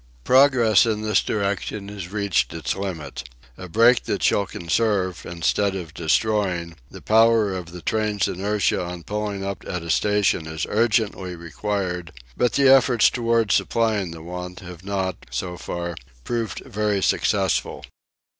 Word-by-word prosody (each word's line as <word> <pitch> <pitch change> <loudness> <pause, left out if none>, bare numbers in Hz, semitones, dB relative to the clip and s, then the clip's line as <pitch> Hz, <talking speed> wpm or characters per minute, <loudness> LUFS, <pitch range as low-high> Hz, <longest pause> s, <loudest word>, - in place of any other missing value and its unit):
Progress 125 -5 +5
in 110 -1 -1
this 105 -1 +2
direction 100 0 -2
has 100 -3 -7
reached 100 -6 0
its 80 - -2
limit. 80 -10 -6 0.3
A 90 +5 -9
brake 115 +6 +4
that 100 - -2
shall 100 -1 +2
conserve, 95 +1 -1
instead 95 +4 0
of 85 -4 -6
destroying, 90 0 0
the - - -12
power 110 -2 +4
of 90 -2 -6
the 90 -1 -10
train's 105 -3 0
inertia 100 +1 0
on 90 -1 -7
pulling 105 -1 -3
up 100 0 -5
at 90 -2 -4
a 85 - -2
station 100 -4 +1
is 80 -1 -3
urgently 105 -5 0
required; 90 +1 -4 0.2
but 125 - +1
the 140 -1 +4
efforts 130 -3 +5
towards 115 -3 +1
supplying 110 -5 +1
the 80 -1 -9
want 90 +1 -7
have 90 -1 -10
not, 95 -1 -3
so 90 +9 -4
far, 85 0 -5 0.3
proved 115 -2 -3
very 105 -5 -1
successful. - - 0
100 Hz, 145 wpm, -23 LUFS, 90-110 Hz, 0.3 s, Progress